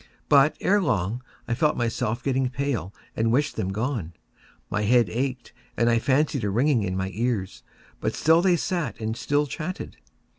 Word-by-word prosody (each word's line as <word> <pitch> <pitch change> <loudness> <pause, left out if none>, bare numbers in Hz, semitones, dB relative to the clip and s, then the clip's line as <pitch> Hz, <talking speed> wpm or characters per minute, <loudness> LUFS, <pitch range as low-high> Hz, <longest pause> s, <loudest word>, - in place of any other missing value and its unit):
But, 145 +1 +5
ere 205 +1 +3
long, 110 - 0 0.3
I 115 - 0
felt 150 +5 +1
myself 115 0 -1
getting 130 -1 +1
pale 130 - -2 0.2
and 115 0 +1
wished 140 +5 +1
them 100 -4 -2
gone. 110 - -2 0.6
My 105 - 0
head 115 -2 +3
ached, 125 0 -3 0.2
and 120 0 +3
I 115 - +3
fancied 140 0 +1
a 105 - 0
ringing 125 +4 +2
in 95 -2 -2
my 95 0 -2
ears: 110 -4 -2 0.4
but - - -2
still 160 +2 +4
they 180 -1 +4
sat 170 -7 -2
and 110 0 -2
still 145 +4 +1
chatted. 165 +6 -6
120 Hz, 175 wpm, -25 LUFS, 110-145 Hz, 0.6 s, But